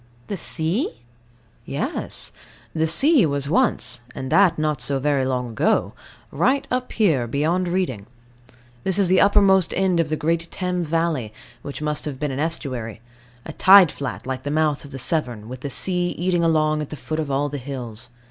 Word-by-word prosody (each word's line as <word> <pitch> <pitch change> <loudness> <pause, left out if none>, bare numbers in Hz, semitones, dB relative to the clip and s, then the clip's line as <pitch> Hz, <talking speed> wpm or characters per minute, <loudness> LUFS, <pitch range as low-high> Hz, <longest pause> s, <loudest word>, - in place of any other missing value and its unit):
The 200 - -3
sea? 160 - -1 0.6
Yes. - - -4 0.4
The 160 0 +1
sea 275 - +4
was 140 -1 -1
once 150 - +1
and 130 0 -5
that 195 -3 +4
not 155 -4 -1
so 140 +2 -1
very 140 -1 +1
long 125 -2 -2
ago 110 - +1 0.4
right 260 - +1
up 250 0 -2
here, 160 - +2
beyond 160 +8 0
Reading. 175 - -2 0.8
This 190 -1 0
is 195 -3 +2
the 185 - +4
uppermost 195 -3 +4
end 185 -2 +2
of 165 -2 +1
the 155 - 0
great 165 +2 -1
Thames 180 -2 -2
valley, 160 -8 -1 0.3
which 145 +3 -7
must 150 0 -1
have 140 -3 -5
been 150 -2 -2
an 130 - -4
estuary 130 -9 -3 0.5
a - - -7
tide 190 -3 +7
flat, 135 -5 -6
like 130 0 -4
the 145 - -5
mouth 150 -1 0
of 145 - -11
the 135 - -7
Severn, 120 -7 -2
with 130 +1 -7
the 140 - -4
sea 180 +5 +1
eating 175 -1 +1
along 155 -2 +2
at 150 - -5
the - - -6
foot 155 +1 -4
of 155 -3 -2
all 140 +1 0
the 145 0 -5
hills. 125 -3 -7
155 Hz, 185 wpm, -22 LUFS, 135-180 Hz, 0.8 s, tide